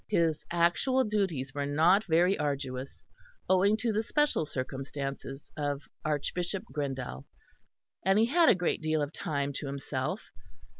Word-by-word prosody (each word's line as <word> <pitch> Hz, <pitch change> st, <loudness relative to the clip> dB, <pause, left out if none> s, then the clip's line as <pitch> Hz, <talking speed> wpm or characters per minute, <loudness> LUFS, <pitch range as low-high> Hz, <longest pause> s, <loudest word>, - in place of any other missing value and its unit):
His 160 Hz, -2 st, +2 dB
actual 175 Hz, +10 st, +3 dB
duties 190 Hz, -, -1 dB
were 140 Hz, 0 st, -2 dB
not 170 Hz, +8 st, +4 dB
very 175 Hz, +3 st, +4 dB
arduous 135 Hz, -2 st, -3 dB, 0.4 s
owing 195 Hz, +3 st, +4 dB
to 225 Hz, 0 st, 0 dB
the 215 Hz, -, +2 dB
special 295 Hz, -, +1 dB
circumstances 135 Hz, +1 st, -5 dB
of 145 Hz, -1 st, -2 dB, 0.2 s
Archbishop 175 Hz, +5 st, -2 dB
Grindal; 130 Hz, -, -3 dB, 0.8 s
and 195 Hz, +2 st, +4 dB
he 220 Hz, -, +5 dB
had 330 Hz, +7 st, +5 dB
a -, -, +7 dB
good 180 Hz, -2 st, 0 dB
deal 155 Hz, -1 st, +1 dB
of 145 Hz, +2 st, -5 dB
time 140 Hz, -5 st, -2 dB
to 140 Hz, -, -4 dB
himself. 140 Hz, +5 st, -3 dB
155 Hz, 140 wpm, -30 LUFS, 140-195 Hz, 0.8 s, a